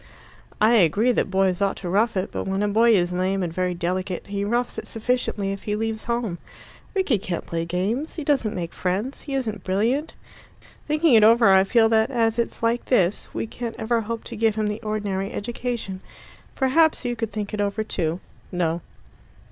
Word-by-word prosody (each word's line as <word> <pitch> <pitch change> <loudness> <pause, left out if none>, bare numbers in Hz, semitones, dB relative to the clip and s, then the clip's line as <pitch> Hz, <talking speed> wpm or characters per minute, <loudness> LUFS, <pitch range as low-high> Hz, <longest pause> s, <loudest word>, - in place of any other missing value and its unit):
"I 215 +3 +5
agree 205 +6 +4
that 235 - 0
boys 190 -1 +1
ought 200 -1 +1
to 185 - -6
rough 205 +4 +1
it; 185 - -2
but - - -4
when 195 +1 0
a - - +2
boy 225 +2 +4
is 175 -2 +1
lame 185 +1 0
and 170 -2 -3
very 180 0 -1
delicate, 180 +1 -2
he 200 0 -3
roughs 240 +4 -1
it - - -8
sufficiently 225 -3 -1
if 195 - -5
he 210 - -2
leaves 220 0 -3
home. 235 -7 -2 0.6
Rickie 340 - +2
can't 180 -3 -4
play 165 0 -3
games. 200 - -2
He 315 - -4
doesn't 270 -7 +1
make 170 -2 -4
friends. 200 +9 -2
He 275 - -5
isn't 225 -6 -3
brilliant. 230 +11 0 0.7
Thinking 305 -1 +3
it 220 -2 +7
over, 225 -2 +6
I 190 0 +6
feel 225 +3 +4
that 220 +1 +3
as 230 -3 +1
it's 235 - -2
like 230 +1 +1
this, 195 -6 +1
we - - -3
can't 230 +1 -6
ever 230 +1 0
hope 230 +1 -4
to 235 - -7
give 220 -1 +2
him 215 -1 0
the 210 +2 -4
ordinary 205 -3 -2
education. 230 -4 -4 0.5
Perhaps 285 +2 +3
you 240 0 -1
could 225 -2 -3
think 210 -1 -5
it 210 - -1
over 205 +1 -1
too." 170 -5 -1 0.3
No. 170 -2 -1
215 Hz, 195 wpm, -24 LUFS, 190-235 Hz, 0.7 s, it